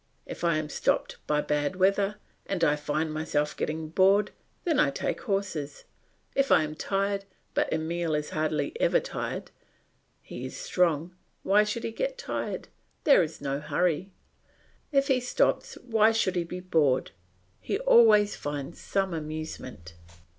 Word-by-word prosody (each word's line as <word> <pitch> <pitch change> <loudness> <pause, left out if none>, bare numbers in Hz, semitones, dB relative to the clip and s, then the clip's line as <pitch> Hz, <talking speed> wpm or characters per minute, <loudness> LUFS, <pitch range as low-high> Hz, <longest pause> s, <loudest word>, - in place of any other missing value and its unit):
If - - -8
I 170 -2 +3
am 155 -1 -2
stopped - - 0
by 150 0 +2
bad 150 +4 -1
weather 195 +2 +2 0.3
and 190 -4 -1
I 150 -2 +4
find 155 +1 -2
myself 150 -1 -1
getting 155 0 -3
bored, 195 +4 +4 0.3
then 325 -5 +1
I 145 - +5
take 140 - -3
horses. 190 -8 -3 0.5
If 275 0 +1
I - - +6
am 155 0 -4
tired 195 +4 -1 0.3
but - - 0
Emile 160 0 -1
is 150 0 -3
hardly 155 0 -1
ever - - +4
tired; - - -5 0.7
he - - -8
is - - -6
strong; 180 - 0 0.3
why 205 +2 +5
should 210 +2 -3
he - - -2
get - - -3
tired? 475 - -4 0.4
There 280 -9 +6
is 165 -3 -4
no 140 0 -2
hurry? 165 +4 0 0.8
If 275 -1 +3
he 265 -2 +3
stops, 250 - 0
why 225 -2 +3
should 195 -4 +1
he 175 -1 0
be 180 +2 -6
bored? 155 -8 +2 0.5
He - - -2
always 225 - +5
finds 145 +2 -5
some 195 -2 -1
amusement. 155 - -6
175 Hz, 155 wpm, -28 LUFS, 155-210 Hz, 0.8 s, I